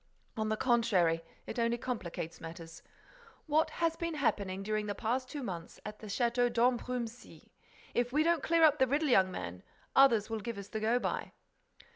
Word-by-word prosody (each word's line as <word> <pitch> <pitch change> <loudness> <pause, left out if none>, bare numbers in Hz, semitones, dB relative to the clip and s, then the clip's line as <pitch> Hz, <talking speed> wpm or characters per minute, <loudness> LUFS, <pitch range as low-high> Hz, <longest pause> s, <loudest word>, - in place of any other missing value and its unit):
On 215 -1 -1
the 215 - 0
contrary, 200 -10 +2 0.2
it - - -5
only 235 0 +1
complicates 190 -9 -5
matters. 165 0 -9 0.6
What 310 +1 +2
has 330 -1 0
been 335 -1 -3
happening 195 -9 -1
during 215 0 -1
the 205 - -2
past 255 +3 -1
two 290 -3 -5
months 170 -6 -6
at 210 0 -7
the 215 - -9
Château 240 +3 +1
d'Ambrumésy? 240 0 -1 0.4
If 240 0 0
we 300 +3 +3
don't 340 0 +2
clear 335 0 +3
up 300 -1 +6
the 260 - +4
riddle, 290 +3 +1
young 190 -6 +5
man, 90 - -6 0.3
others 235 -6 +6
will 225 -1 -3
give 230 +1 -5
us 200 -1 -8
the 220 - -3
go 225 +3 +2
by." - - -3
235 Hz, 180 wpm, -32 LUFS, 200-260 Hz, 0.6 s, up